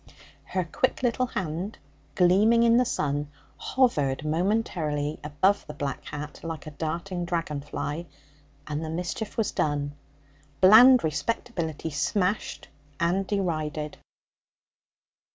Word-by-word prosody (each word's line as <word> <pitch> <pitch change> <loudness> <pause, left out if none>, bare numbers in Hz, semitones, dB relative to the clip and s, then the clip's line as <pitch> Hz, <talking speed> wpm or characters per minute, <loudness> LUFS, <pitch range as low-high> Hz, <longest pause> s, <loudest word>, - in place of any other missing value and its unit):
Her 185 - -1
quick 260 - -1
little 250 +1 +1
hand, 185 -2 -4 0.4
gleaming 210 +6 +5
in 235 0 +5
the 250 - +4
sun, 145 -6 -1 0.3
hovered 150 - +1
momentarily 155 -4 0
above 155 +7 +1
the 150 - -8
black 140 -1 -4
hat 150 0 -7
like 165 -2 -6
a 155 - -7
darting 170 +4 -3
dragon 165 -4 -2
fly, 150 +3 -4 0.6
and 150 +1 -3
the 160 - -4
mischief 180 +6 -4
was 225 -3 +1
done 145 -1 -1 0.7
bland 240 +7 +8
respectability 160 - -2
smashed 180 +8 -1 0.3
and 185 +3 +1
derided. 155 -6 -2
170 Hz, 115 wpm, -27 LUFS, 150-205 Hz, 0.7 s, bland